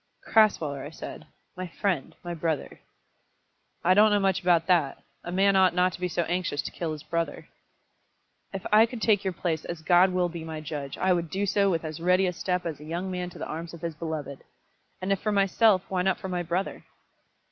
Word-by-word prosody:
"Crasweller," 160 -11 +3
I - - -6
said, 160 - -9 0.3
"my 185 0 -5
friend, 175 -4 -2
my 175 0 -4
brother!" 160 -3 -3 1.0
"I 185 - +5
don't 210 +3 +6
know 205 -1 +3
much 195 -2 +1
about 175 -2 +3
that. 165 -6 +1 0.2
A 175 - -5
man 195 +2 +3
ought 190 -2 +4
not 180 0 +3
to - - -8
be 180 - -1
so 170 0 -1
anxious 175 -3 -1
to - - -5
kill 165 -2 -3
his 150 -1 -8
brother." 170 0 -3 1.0
"If 195 -1 -6
I 220 +2 +7
could 240 0 -7
take 210 -3 +3
your 190 - 0
place, 165 -3 -2
as 170 -2 -6
God 175 +3 +5
will 180 -1 +1
be 170 -1 -7
my 160 -1 -6
judge, 145 -2 -6
I 185 0 +3
would 170 -2 -1
do 195 +4 -1
so 200 0 +2
with 165 -3 -1
as 155 0 -5
ready 180 +3 +3
a 180 - 0
step 180 0 -2
as 160 -4 -4
a - - -11
young 170 +4 -4
man 180 -1 -3
to - - -13
the - - -5
arms 165 +2 -6
of 165 - -14
his 170 -1 -3
beloved. 155 -3 -5 0.6
And 190 - -1
if 195 - +1
for 215 - 0
myself, 200 0 +3
why 185 -1 -1
not 190 0 +1
for 190 - -6
my 180 -1 -1
brother?" 175 +3 -3
180 Hz, 225 wpm, -27 LUFS, 165-190 Hz, 1.0 s, I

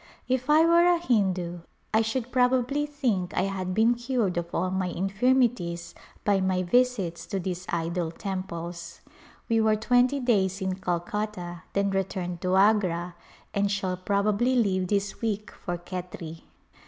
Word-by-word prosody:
If 255 +1 -1
I 310 +2 +6
were 340 +1 +5
a 350 -1 +5
Hindu 190 - 0 0.3
I 220 - +5
should 230 +2 -2
prob 250 0 +3
ably 275 +4 0
think 240 -11 -1
I - - +3
had 190 -2 -2
been 225 +2 +4
cured 240 -5 -1
of 175 -1 -2
all 185 +2 -1
my 190 -1 0
infirmities 195 -3 0 0.3
by 200 -2 +3
my 185 -1 +1
visits 195 -4 +1
to 195 - -2
these 180 0 -4
idol 170 0 -1
temples. 170 -2 -6 0.5
We 225 -1 +2
were 220 0 +3
twenty 245 +5 +2
days 195 -7 +1
in 190 -1 -1
Calcutta, 180 0 -3
then 200 0 +1
returned 185 -2 -2
to 185 0 +1
Agra 190 -4 +3 0.4
and 200 0 +1
shall 195 -2 -1
prob 200 +2 0
ably 235 +5 +2
leave 190 -6 +2
this 200 +1 -1
week 215 -2 -2
for 175 -1 -5
Khetri. 175 -2 -7
195 Hz, 155 wpm, -27 LUFS, 180-235 Hz, 0.5 s, I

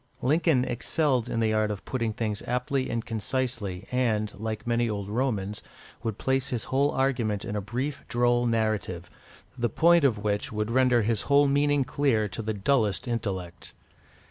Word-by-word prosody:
Lincoln 150 -1 +3
excelled 130 0 0
in 115 - -1
the 110 -1 +2
art 110 0 +2
of 105 -1 -5
putting 115 -4 -1
things 105 -1 -3
aptly 125 +2 -1
and 115 -1 -2
concisely, 115 -4 -3
and, 110 -4 0
like 110 0 -4
many 120 0 +1
old 100 -2 -3
Romans, 105 -3 -1 0.4
would 110 -3 -3
place 135 0 0
his 120 -3 -2
whole 140 +2 +1
argument 120 -7 0
in 105 - -4
a 105 - -1
brief 125 +8 -4
droll 120 0 +2
narrative, 110 -7 -1 0.4
the 120 -2 0
point 170 0 +4
of 125 -6 +3
which 105 0 -2
would 105 +1 -2
render 125 -2 +4
his 110 -1 0
whole 140 0 +5
meaning 145 0 +2
clear 125 -5 +1
to 115 - -5
the 110 0 -2
dullest 105 0 +1
intellect. 95 -7 -4
115 Hz, 170 wpm, -27 LUFS, 105-130 Hz, 0.4 s, whole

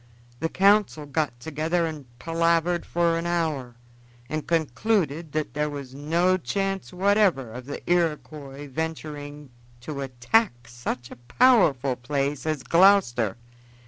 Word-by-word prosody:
The 165 - -1
council 195 -5 +3
got 145 -4 -2
together 160 +5 -1
and 155 -5 -6
palavered 165 +3 +1
for 170 -1 +1
an 170 - -3
hour, 155 -8 -1 0.5
and 155 +2 -4
concluded 165 - 0
that 155 -1 -2
there 150 +1 -1
was 140 -3 -7
no 170 +6 +1
chance 195 +6 -2
whatever 190 - +2
of 125 +3 -9
the 145 - -7
Iroquois 150 -4 -1
venturing 145 -1 -6 0.3
to 140 +2 -5
attack 125 - 0
such 120 +1 -5
a - - -10 0.2
powerful 160 - +4
place 140 +4 -2
as 155 -4 -1
Gloucester. 165 - +4
155 Hz, 125 wpm, -25 LUFS, 135-175 Hz, 0.5 s, powerful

